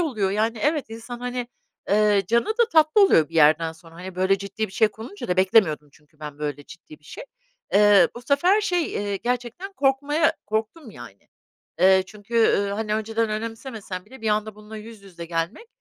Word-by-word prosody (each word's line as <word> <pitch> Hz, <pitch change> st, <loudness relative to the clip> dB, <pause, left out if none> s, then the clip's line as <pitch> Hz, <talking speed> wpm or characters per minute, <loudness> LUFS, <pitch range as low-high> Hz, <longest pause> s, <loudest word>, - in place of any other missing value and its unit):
oluyor 220 Hz, -, -1 dB
yani 220 Hz, +3 st, -1 dB
evet, 295 Hz, -5 st, 0 dB
insan 230 Hz, +2 st, -8 dB
hani, 245 Hz, -1 st, -4 dB, 0.4 s
eee, 210 Hz, -1 st, +3 dB
canı 235 Hz, +4 st, +1 dB
da 455 Hz, +1 st, +1 dB
tatlı 315 Hz, +5 st, +4 dB
oluyor 165 Hz, -, +5 dB
bir 165 Hz, -, -17 dB
yerden 160 Hz, +1 st, +4 dB
sonra. 165 Hz, 0 st, -18 dB
Hani, 180 Hz, +2 st, -9 dB
böyle 190 Hz, +2 st, +1 dB
ciddi 200 Hz, +3 st, -4 dB
bir 190 Hz, -, -16 dB
şey 220 Hz, -, +3 dB
konunca 225 Hz, -, -9 dB
da 180 Hz, -, 0 dB
beklemiyordum 185 Hz, -6 st, +3 dB
çünkü 150 Hz, +1 st, -27 dB
ben 150 Hz, -1 st, -8 dB
böyle 145 Hz, -1 st, -5 dB
ciddi 160 Hz, -2 st, -14 dB
bir -, -, -31 dB
şey. -, -, -10 dB, 0.5 s
Eee, 205 Hz, -3 st, +6 dB
bu 240 Hz, -, -9 dB
sefer 350 Hz, -, +3 dB
şey, 355 Hz, -5 st, 0 dB
eee, 205 Hz, -1 st, -2 dB
gerçekten 245 Hz, -, -4 dB
korkmaya 290 Hz, +2 st, +1 dB
korktum 220 Hz, +6 st, -4 dB
yani. 120 Hz, -, -13 dB, 0.5 s
Eee, 190 Hz, +1 st, +5 dB
çünkü, 210 Hz, +3 st, -12 dB
üüü, 205 Hz, -3 st, +3 dB
hani, 210 Hz, +1 st, -2 dB
önceden 225 Hz, +1 st, -1 dB
önemsemesem 220 Hz, -3 st, -6 dB
bile 260 Hz, +4 st, -15 dB
bir 225 Hz, -, -2 dB
anda 215 Hz, 0 st, -1 dB
bununla 210 Hz, +1 st, -11 dB
yüz 220 Hz, -1 st, -11 dB
yüze 175 Hz, -4 st, -10 dB
gelmek, 165 Hz, -, -4 dB
215 Hz, 185 wpm, -23 LUFS, 185-245 Hz, 0.5 s, Eee